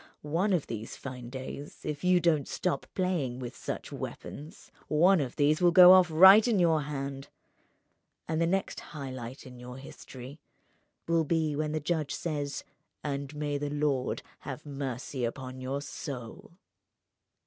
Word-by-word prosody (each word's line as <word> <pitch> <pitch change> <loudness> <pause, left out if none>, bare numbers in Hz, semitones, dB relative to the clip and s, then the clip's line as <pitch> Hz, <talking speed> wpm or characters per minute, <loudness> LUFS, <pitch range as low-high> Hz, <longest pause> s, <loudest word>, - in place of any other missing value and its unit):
One 170 +8 0
of 175 -6 +1
these 115 -1 -6
fine 125 -3 -8
days, 130 +3 -8
if 150 +1 -4
you 180 0 +5
don't 160 -5 +2
stop 180 - -2
playing 170 -10 -1
with 125 -2 -6
such - - -6
weapons, 150 +3 -8 0.2
one 175 +3 +4
of 130 -3 -4
these 150 +2 +2
will 175 - +6
go 180 +1 +9
off 185 -1 +7
right 190 +8 +8
in 230 -4 +2
your 165 -4 +3
hand—and 140 +3 -8
the 165 - +3
next 195 +2 -1
high 140 -4 -7
light 130 +2 -8
in 125 -1 -11
your 125 +1 -9
history 135 +1 -10 0.7
will 165 -1 +3
be 155 -1 0
when 150 +1 -1
the 155 - -1
judge 155 -2 -1
says: 145 -4 -3 0.4
'And 140 0 -4
may 145 -1 -2
the 145 0 -2
Lord 145 -3 -1 0.2
have 140 +3 -7
mercy 135 -2 -4
on 130 +1 -7
your 135 +2 -3
soul! 125 +1 -7
145 Hz, 155 wpm, -29 LUFS, 130-165 Hz, 0.7 s, go